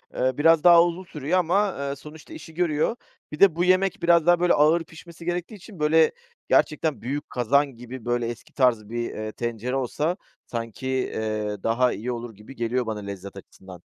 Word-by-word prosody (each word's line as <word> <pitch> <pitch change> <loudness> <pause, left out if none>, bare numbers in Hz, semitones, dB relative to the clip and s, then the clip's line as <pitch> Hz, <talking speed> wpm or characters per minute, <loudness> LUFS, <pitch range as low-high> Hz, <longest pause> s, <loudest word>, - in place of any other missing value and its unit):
Eee, 130 +1 0
biraz 165 +1 +4
daha 170 -1 +8
uzun 175 +2 -2
sürüyor 160 +1 -1
ama, 195 +4 +2
ııı, 140 0 -4
sonuçta 155 - -13
işi 180 - -11
görüyor. 170 +5 0 0.4
Bir 150 - -7
de 195 -5 +6
bu 175 - +1
yemek 185 0 +2
biraz 170 -2 +4
daha 175 0 +5
böyle 175 0 +3
ağır 160 +3 +4
pişmesi 165 +1 -13
gerektiği 175 +4 -3
için, 195 -1 -13
böyle, 155 +1 +4 0.4
gerçekten 150 -5 +1
büyük 140 +5 -4
kazan 135 +3 +1
gibi, 120 0 -10
böyle, 120 -1 0
eski 120 0 -8
tarz 115 -5 +2
bir, 120 +1 -3
eee, 110 0 -5
tencere 120 +2 -4
olsa 150 +7 -1 0.3
sanki, 115 +2 -6
eee, 110 -5 -2
daha 125 +2 +2
iyi 120 +4 -4
olur 120 -2 -6
gibi 105 +6 -13
geliyor 120 +1 -1
bana 110 -1 -4
lezzet 100 -1 -8
açısından. 95 -2 -13
140 Hz, 185 wpm, -24 LUFS, 120-170 Hz, 0.4 s, daha